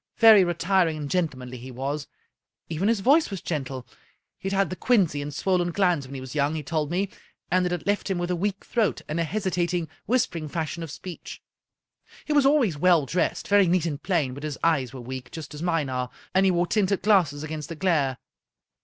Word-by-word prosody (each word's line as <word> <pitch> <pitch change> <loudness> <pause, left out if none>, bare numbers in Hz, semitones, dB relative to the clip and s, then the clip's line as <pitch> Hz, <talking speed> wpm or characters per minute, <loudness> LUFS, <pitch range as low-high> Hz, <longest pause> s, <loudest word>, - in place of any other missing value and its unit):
Very 220 -4 +8
retiring 175 -1 +1
and 145 -2 -5
gentlemanly 130 -8 -2
he 130 +2 -9
was. 140 +4 -4 0.6
Even 165 +5 -1
his 225 -3 +2
voice 290 +8 +4
was 195 -3 -4
gentle. 135 -6 -4 0.5
He'd 195 - -3
had 195 -1 +1
the - - -2
quinsy 185 - +2
and 145 +1 -5
swollen 180 +2 0
glands 175 -7 +1
when 140 - -8
he - - -4
was 130 -1 -8
young, 150 +1 +1
he 155 - -4
told 150 0 -1
me, 185 +4 0 0.4
and 180 0 +3
it - - -3
had 175 -2 -3
left 205 +1 0
him 190 - 0
with 175 0 -2
a - - +1
weak 200 +3 -2
throat 225 -4 0
and 155 +3 -2
a - - +2
hesitat 180 -1 -1
ing, 170 -2 -1 0.2
whispering 235 -10 0
fashion 160 +1 -3
of 165 - -5
speech. 175 +4 -8 0.9
He 305 - -1
was 285 -2 +5
always 245 - +2
well 175 -3 +4
dressed, 175 +6 -1
very 200 -2 +5
neat 175 -1 +2
and 150 -3 -3
plain, 160 -9 0
but 140 - -8
his 150 -2 -4
eyes 150 -7 +2
were 130 -2 -8
weak, 125 0 -7
just 155 -3 -8
as 150 - -8
mine 165 -4 0
are, 125 -1 -2 0.2
and 190 +1 +4
he - - +4
wore 175 0 +2
tinted 200 0 +1
glasses 170 -9 +3
against 155 -1 -5
the 165 - -5
glare." 150 -7 +1
170 Hz, 215 wpm, -25 LUFS, 145-190 Hz, 0.9 s, Very